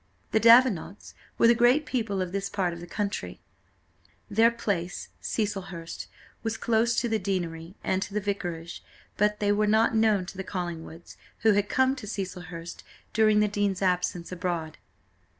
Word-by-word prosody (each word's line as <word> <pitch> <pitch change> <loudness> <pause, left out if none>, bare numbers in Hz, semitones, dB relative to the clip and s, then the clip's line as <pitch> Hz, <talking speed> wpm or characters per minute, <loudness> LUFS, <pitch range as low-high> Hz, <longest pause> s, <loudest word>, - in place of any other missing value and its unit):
The 220 - +3
Davenants 230 -5 +4 0.2
were - - +4
the 235 - +7
great 245 +6 +4
people 220 -8 -1
of 180 - -6
this 200 +1 -2
part 180 -4 -1
of 170 - -8
the 175 - -9
country; 205 +3 -3 0.9
their 225 +3 +5
place, 195 -7 -3
Cecilhurst, 195 -6 -4 0.3
was 225 -1 -2
close 230 +1 +2
to 240 - -1
the 220 -1 0
deanery 175 -3 -3
and 190 - 0
to 200 +1 -5
the - - +2
vicarage, 175 -5 -4 0.3
but 210 0 +2
they 205 -1 +2
were 210 +1 +2
not 220 +2 +3
known 220 -4 +3
to 190 - -10
the 190 - -3
Collingwoods, 170 -3 -6 0.2
who 220 - +5
had 205 0 +1
come 260 +1 +3
to 225 -6 -8
Cecilhurst 180 -4 -6 0.3
during 215 -1 +4
the 210 - +3
dean's 200 -2 -1
absence 180 -1 0
abroad. 170 -3 -3
200 Hz, 165 wpm, -27 LUFS, 180-220 Hz, 0.9 s, the